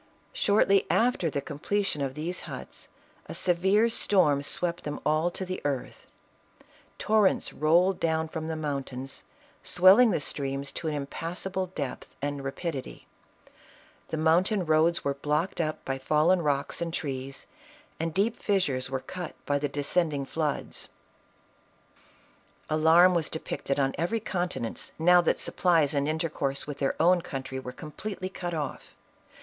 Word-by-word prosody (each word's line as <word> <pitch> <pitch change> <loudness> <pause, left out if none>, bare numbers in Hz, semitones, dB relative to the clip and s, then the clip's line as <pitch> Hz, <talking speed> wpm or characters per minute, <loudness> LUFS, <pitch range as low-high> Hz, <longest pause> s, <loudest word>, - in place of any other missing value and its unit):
Shortly 200 -1 +3
after 230 -8 +2
the 140 - -2
completion 155 +4 -2
of 135 -1 -2
these 170 +4 -3
huts, - - -9 0.4
a - - -6
severe 190 +5 +3
storm 180 -10 +3
swept 170 +4 -2
them 150 - -4
all 155 +3 +2
to 190 +2 -4
the 185 0 -5
earth; 140 -3 -4 0.9
torrents 215 -2 +2
rolled 175 +5 +3
down 160 -1 0
from 160 0 -5
the 160 - -2
mountains, 135 -3 -4 0.4
swelling 195 +7 +6
the - - +1
streams 140 -1 -3
to 165 - -5
an 155 - -1
impassable 175 +6 -4
depth 145 -8 -6
and 145 -1 -3
rapidity; 135 0 -5 1.0
the 160 - -3
mountain 175 +5 +2
roads 160 +2 +3
were 140 - 0
blocked 150 +6 -1
up 155 -1 -3
by 135 0 -2
fallen 155 +6 +3
rocks 145 -1 0
and 170 0 -2
trees, 135 -2 -4 0.5
and 165 +1 -1
deep 210 +7 0
fissures 145 -11 0
were 130 0 -2
cut 180 +2 -7
by 145 0 +1
the 145 0 -1
descending 145 0 0
floods. 150 0 -3 1.8
Alarm 165 +4 +6
was 170 -3 0
depicted 145 -3 -3
on 135 -1 +1
every 175 +8 0
countenance, 175 - -3
now 180 +2 +6
that - - +1
supplies 165 -6 +2
and 140 0 +1
intercourse 155 -4 -2
with 145 -1 -7
their 135 - 0
own 175 +2 +4
country 135 -6 -5
were 125 -1 -7
completely 185 +7 -6
cut 175 -2 -4
off. 145 -4 -5
160 Hz, 145 wpm, -28 LUFS, 140-180 Hz, 1.8 s, swelling